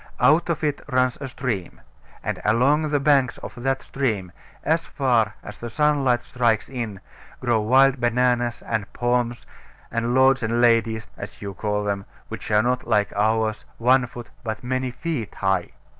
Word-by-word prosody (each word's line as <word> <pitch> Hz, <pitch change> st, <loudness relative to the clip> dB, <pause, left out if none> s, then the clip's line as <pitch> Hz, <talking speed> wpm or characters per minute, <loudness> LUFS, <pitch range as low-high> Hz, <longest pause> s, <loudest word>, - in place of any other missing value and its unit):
Out 165 Hz, +3 st, +4 dB
of 165 Hz, -, -1 dB
it 150 Hz, -2 st, 0 dB
runs 130 Hz, -1 st, +2 dB
a 135 Hz, -, -3 dB
stream; 120 Hz, -8 st, -4 dB, 0.4 s
and -, -, -3 dB
along 140 Hz, +8 st, +3 dB
the 145 Hz, -1 st, +2 dB
banks 140 Hz, -3 st, +3 dB
of -, -, -8 dB
that 135 Hz, +1 st, 0 dB
stream, 110 Hz, -10 st, -2 dB, 0.3 s
as 165 Hz, +1 st, +1 dB
far 120 Hz, -6 st, +1 dB
as 105 Hz, 0 st, -9 dB
the 120 Hz, -, -5 dB
sunlight 140 Hz, -3 st, +2 dB
strikes 120 Hz, -3 st, +1 dB
in, 115 Hz, -7 st, -5 dB, 0.4 s
grow 120 Hz, -3 st, +1 dB
wild 130 Hz, +4 st, +4 dB
bananas, 120 Hz, 0 st, +1 dB
and 110 Hz, -3 st, -2 dB
palms, 120 Hz, -1 st, 0 dB, 0.5 s
and 115 Hz, +1 st, 0 dB
lords 130 Hz, 0 st, +5 dB
and 115 Hz, +1 st, 0 dB
ladies 115 Hz, -2 st, +3 dB
(as -, -, -8 dB
you 100 Hz, -1 st, -6 dB
call 105 Hz, +1 st, -2 dB
them), 100 Hz, -1 st, -2 dB, 0.2 s
which -, -, -7 dB
are 105 Hz, 0 st, +4 dB
not, 125 Hz, 0 st, 0 dB
like 105 Hz, -3 st, +2 dB
ours, 110 Hz, +1 st, +1 dB
one 125 Hz, +2 st, +3 dB
foot, 120 Hz, -1 st, -10 dB
but 110 Hz, 0 st, -4 dB
many 130 Hz, +1 st, -1 dB
feet 125 Hz, -, -4 dB
high. 95 Hz, -2 st, 0 dB
120 Hz, 165 wpm, -23 LUFS, 110-130 Hz, 0.5 s, lords